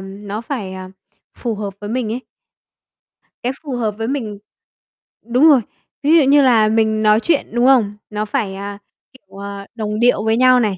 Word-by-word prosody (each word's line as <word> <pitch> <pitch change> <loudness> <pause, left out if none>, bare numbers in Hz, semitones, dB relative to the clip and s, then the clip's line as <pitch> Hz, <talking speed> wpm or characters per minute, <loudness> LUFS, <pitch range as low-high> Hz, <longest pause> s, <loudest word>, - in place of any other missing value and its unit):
nó 200 +2 -7
phải, 230 -6 -5
à, 185 0 -8 0.4
phù 235 -3 -3
hợp 205 -2 -5
với 205 0 -6
mình 235 -2 -2
ấy. 245 - -3 1.2
Cái 250 - -1
phù 280 -5 -4
hợp 220 -4 -1
với 225 0 -2
mình 230 -7 -3 0.9
đúng 250 +7 +3
rồi, 285 -6 +6 0.4
ví 310 +4 +5
dụ 315 - +5
như 285 +2 +5
là 230 -5 +4
mình 220 0 +1
nói 215 0 +5
chuyện, 310 +3 0
đúng 240 +1 +2
không, 230 -6 +3
nó 210 0 -3
phải, 205 -2 -2
à, 200 +1 -6 0.4
kiểu, 200 -6 -13
à, 200 0 -7
đồng 215 -2 -3
điệu 240 -3 +3
với 220 0 +2
nhau 255 0 +5
này, 210 -5 0
220 Hz, 190 wpm, -18 LUFS, 205-250 Hz, 1.2 s, rồi